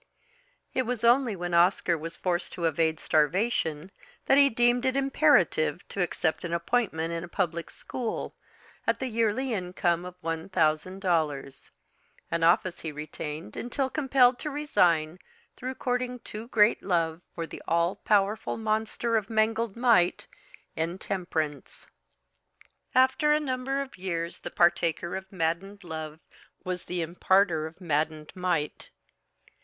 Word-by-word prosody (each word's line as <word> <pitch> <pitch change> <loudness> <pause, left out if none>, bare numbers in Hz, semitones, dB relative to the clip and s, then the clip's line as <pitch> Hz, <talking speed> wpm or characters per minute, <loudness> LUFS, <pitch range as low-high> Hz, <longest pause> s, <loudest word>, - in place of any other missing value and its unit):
It 260 - +2
was 245 -2 -2
only 240 -1 +4
when 175 -1 -4
Oscar 170 0 +4
was 165 +1 -5
forced 175 -1 -1
to 170 - -3
evade 160 0 +1
starvation 160 +1 +1 0.3
that 270 - +5
he 280 -1 +7
deemed 240 +1 +3
it 260 0 +1
imperative 270 - +2
to 195 - -3
accept 165 -2 -1
an 170 -1 -3
appointment 170 -3 0
in 165 0 -3
a - - -7
public 170 -2 -2
school, 240 -3 -4 0.5
at - - +2
the 265 - -3
yearly 230 +2 0
income 180 -3 0
of 180 0 -8
one 165 +2 -3
thousand 185 +2 +1
dollars, 155 -7 -1 0.6
an 170 0 0
office 175 +1 +3
he 160 - -4
retained 150 -4 -6
until 260 +2 -2
compelled 265 -4 +3
to 300 - -3
resign 180 - +1 0.4
through 260 +1 -5
courting 250 0 -2
too 225 -1 -8
great 215 -2 +4
love 165 -3 0
for 165 - -3
the - - -9
all 170 +2 +2
powerful 210 +2 +1
monster 220 +1 0
of 215 -2 -3
mangled 225 -1 +1
might 230 -8 +3 0.5
Intemperance. 165 -3 -3 1.1
After 260 +4 +4
a 300 - +4
number 270 -1 -2
of 270 -8 -14
years 170 -2 -3
the - - -6
partaker 170 0 +1
of 190 0 -7
maddened 190 +3 -2
love 160 -2 -6 0.4
was 180 -1 -4
the 180 -1 -2
imparter 170 -1 +2
of 160 +3 -14
maddened 155 -2 -1
might. 175 -5 -2
180 Hz, 140 wpm, -28 LUFS, 165-235 Hz, 1.1 s, he